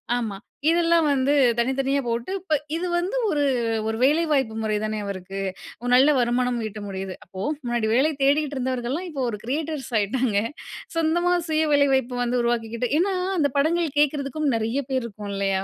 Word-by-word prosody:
ஆமா. 225 -5 -2 0.3
இதெல்லாம் 335 -1 +3
வந்து, 275 +1 +2 0.2
தனித்தனியா 270 +3 +1
போட்டு 235 +6 -2
இப்ப 360 -4 -3 0.2
இது 360 +2 -2
வந்து 365 +8 -1
ஒரு 295 -5 +1 0.4
ஒரு 220 - -1
வேலைவாய்ப்பு 285 -5 +2
முறை 215 -1 0
தானே 215 0 -2
அவருக்கு? 195 0 -6 0.4
ஒரு 245 - -3
நல்ல 275 +4 +6
வருமானம் 245 0 +1
ஈட்ட 210 0 -8
முடியுது. 190 -1 -5
அப்போ, 185 +1 -8 0.2
முன்னாடி 240 -2 0
வேலை 275 +6 +3
தேடிக்கிட்டுருந்தவர்கள்லாம் 275 +1 0
இப்போ 280 -5 -3
ஒரு 210 - -6
"கிரியேட்டர்ஸ்" 290 +1 -3
ஆயிட்டாங்க. 215 0 +1 0.6
சொந்தமா, 340 +2 +2 0.2
சுய 315 0 +2
வேலை 285 0 +5
வாய்ப்பு 260 -1 0
வந்து 245 +1 0
உருவாக்கிக்கிட்டு. 235 0 -1
ஏன்னா, 385 +2 +2 0.2
அந்த 285 -3 +2
படங்கள் 320 0 +1
கேக்குறதுக்கும் 290 0 +1
நெறைய 225 +5 -1
பேரு 260 -2 0
இருக்கோம், 210 -2 -7
இல்லையா? 195 -1 0
260 Hz, 155 wpm, -24 LUFS, 225-300 Hz, 0.6 s, நல்ல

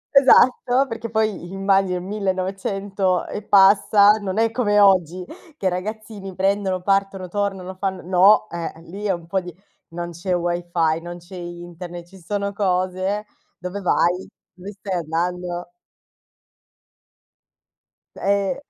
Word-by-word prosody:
Esatto, 260 -1 +5
perché 230 -1 -5
poi 215 -5 -1
immagino 195 -1 +1
il 180 - -6
1900 195 -1 -1
e 210 - -5
passa, 200 +1 +6
non 190 +1 -3
è 225 0 +2
come 210 -4 +2
oggi 185 -3 +3 0.3
che 195 - -7
i - - +5
ragazzini 200 0 -6
prendono, 190 -1 0
partono, 195 -1 0
tornano, 195 -2 -3
fan 190 -1 -4
no, 195 +4 +5
eh, 170 -1 -4
lì 195 +5 -8
è 200 - +2
un 170 -1 -7
po' 190 +3 -1
di 175 -1 -8 0.4
non 175 0 -5
c'è 175 +2 -2
wifi, 175 -2 0
non 175 +1 -7
c'è 175 +2 -13
internet, 175 0 -8
ci 190 +2 -16
sono 200 +3 -3
cose. 185 +1 -1 0.3
Dove 180 +3 -6
vai? 180 0 +1 0.3
Dove 185 +3 -10
stai 195 -1 -6
andando? 175 +2 -3 2.4
Eh. 200 +6 0
190 Hz, 130 wpm, -22 LUFS, 175-200 Hz, 2.4 s, passa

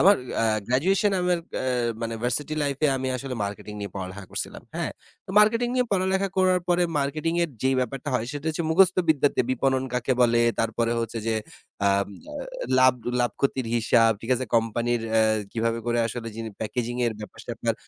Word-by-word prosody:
আমার 200 +4 +7 0.3
আ - - +3 0.2
গ্র্যাজুয়েশন 190 - +2
আমার 180 -1 +2 0.2
অ্যা - - -2 0.4
মানে 115 0 -2
ভার্সিটি 145 +5 0
লাইফ 140 -1 -1
এ - - +7
আমি 130 - -2
আসলে 130 +1 -5
মার্কেটিং 100 +1 -6
নিয়ে 100 -3 -5
পড়ালেখা 95 +1 -6
করছিলাম, - - -5
হ্যাঁ? - - -1 0.4
তো - - -7
মার্কেটিং 230 +3 +3
নিয়ে 250 -1 +2
পড়ালেখা 190 +1 +1
করার 185 -1 +4
পরে 175 0 +3 0.2
মার্কেটিং 155 +4 -1
এর 165 - -5
যেই 135 0 +3
ব্যাপারটা 130 +3 -3
হয় 120 -2 0
সেটা 145 +1 -6
হচ্ছে 160 +2 -1
মুখস্থ 185 +2 +5
বিদ্যাতে 145 -2 +3
বিপণন 130 +1 +1
কাকে 125 +1 +1
বলে? 120 -1 +4 0.2
তারপরে 115 +1 0
হচ্ছে 115 0 -3
যে 110 - +1 0.5
আম 100 0 +2 0.2
আ - - -7 0.4
লাভ 130 -1 +6 0.3
লাভক্ষতির 120 +1 0
হিসাব, 115 0 +4
ঠিক 115 - -6
আছে? 130 - -2
কোম্পানির 115 +1 +1
অ্যা 110 - +5 0.3
কিভাবে 115 0 0
করে 120 0 +1
আসলে 115 0 -5
যিনি 115 -1 -5
প্যাকেজিং 120 +2 -2
এর 115 - 0
ব্যাপার-স্যাপার। 115 +1 -4
125 Hz, 180 wpm, -25 LUFS, 115-155 Hz, 0.5 s, আমার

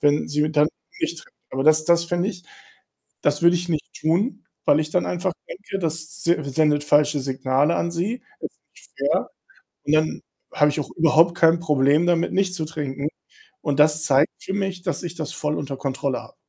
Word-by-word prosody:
wenn 145 0 +2
sie 150 +1 0
dann 150 0 +4 0.3
nicht 170 - -2
trinkt, - - -20 0.2
aber 135 +1 -2
das 155 0 +5
das 170 0 +3
fände 175 +3 -1
ich 180 -4 -7 0.8
das 145 +2 +1
würde 170 +1 +5
ich 175 +1 -4
nicht 155 -3 -3
tun, 175 - 0 0.2
weil 145 - +4
ich 155 0 -3
dann 180 - +1
einfach 180 +1 -1 0.2
denke, 195 +1 -6
das 160 -1 -3
s 150 -6 0
sendet 150 -2 +2
falsche 150 0 +3
Signale 135 +3 +1
an 170 - -1
sie. 205 +9 -2 0.2
Es - - -3
ist - - -37 0.2
nicht - - -18
fair - - 0 0.6
und 150 - 0
dann 155 0 0 0.3
habe 150 - +4
ich 150 - -3
auch 145 - -4
überhaupt 165 +1 +4
kein 165 0 +4
Problem 150 0 +3
damit, 170 -1 +1
nicht 190 -1 +1
zu 160 -3 -2
trinken 145 -2 -4 0.6
und 145 -1 0
das 155 +1 +4
zeigt 140 0 +4
für 190 - -5
mich, 195 -3 -3
dass - - -2
ich 175 - -5
das 155 -3 -4
voll 150 0 -2
unter 140 -1 -5
Kontrolle 135 -1 -2
habe. - - -16
155 Hz, 200 wpm, -23 LUFS, 145-170 Hz, 0.8 s, das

